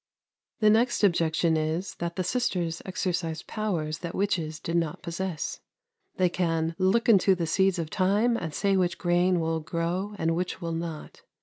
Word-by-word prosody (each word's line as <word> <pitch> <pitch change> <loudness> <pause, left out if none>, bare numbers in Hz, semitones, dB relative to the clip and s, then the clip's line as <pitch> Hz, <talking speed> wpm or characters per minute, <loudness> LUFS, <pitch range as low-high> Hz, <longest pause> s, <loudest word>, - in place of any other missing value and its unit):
The 215 -1 +6
next 235 +1 +2
objection 170 -3 +3
is, 160 +4 -1
that 170 0 -3
the 185 - -1
sisters 180 -6 -1
exercise 175 -3 -2
powers 170 -8 -2
that 170 -2 -5
witches 165 -6 -1
did 165 - -3
not 170 +1 -1
possess. 170 -1 -3 0.6
They 185 - +4
can 165 -2 0
"look 190 +5 +2
into 195 -3 +5
the 170 -2 -2
seeds 190 +3 +2
of 165 -2 -4
time, 205 +5 +2
and 165 -8 -3
say 195 +5 +1
which 180 -2 +1
grain 175 0 +2
will 160 0 0
grow, 170 +6 -2
and 165 -1 0
which 180 +1 -2
will 170 -2 -4
not." 165 -2 -6
175 Hz, 170 wpm, -27 LUFS, 165-190 Hz, 0.6 s, The